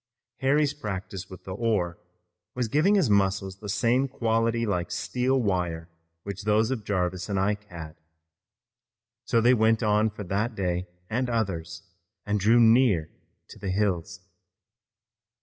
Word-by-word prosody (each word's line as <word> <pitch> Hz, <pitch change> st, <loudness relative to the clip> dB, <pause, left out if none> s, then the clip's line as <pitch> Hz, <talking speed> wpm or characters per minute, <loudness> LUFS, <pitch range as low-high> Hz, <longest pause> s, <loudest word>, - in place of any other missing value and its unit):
Harry's 145 Hz, +2 st, +2 dB
practice 95 Hz, -7 st, -6 dB
with 95 Hz, -, -11 dB
the 95 Hz, -, -7 dB
oar 95 Hz, -6 st, -1 dB, 0.6 s
was 125 Hz, -2 st, -1 dB
giving 155 Hz, -, +3 dB
his 190 Hz, -8 st, +3 dB
muscles 95 Hz, -1 st, +1 dB
the 105 Hz, -, -7 dB
same 120 Hz, +6 st, +2 dB
quality 115 Hz, -1 st, 0 dB
like 90 Hz, -5 st, -1 dB
steel 130 Hz, +2 st, 0 dB
wire 90 Hz, -6 st, -1 dB, 0.3 s
which 100 Hz, 0 st, -6 dB
those 110 Hz, +3 st, +2 dB
of 120 Hz, -5 st, -3 dB
Jarvis 90 Hz, -2 st, -2 dB
and 100 Hz, -1 st, 0 dB
Ike 105 Hz, +2 st, 0 dB
had. 80 Hz, -5 st, -9 dB, 1.3 s
So 115 Hz, -, +2 dB
they 120 Hz, +2 st, +5 dB
went 110 Hz, 0 st, +3 dB
on 105 Hz, +1 st, +3 dB
for 105 Hz, 0 st, -8 dB
that 105 Hz, +5 st, -2 dB
day 90 Hz, -2 st, -2 dB, 0.2 s
and 125 Hz, +4 st, -1 dB
others 90 Hz, -8 st, -2 dB, 0.4 s
and 105 Hz, 0 st, 0 dB
drew 110 Hz, +5 st, +4 dB
near 115 Hz, -8 st, +4 dB, 0.4 s
to -, -, -12 dB
the 100 Hz, -, -4 dB
hills. 95 Hz, -3 st, -1 dB
105 Hz, 145 wpm, -26 LUFS, 95-115 Hz, 1.3 s, they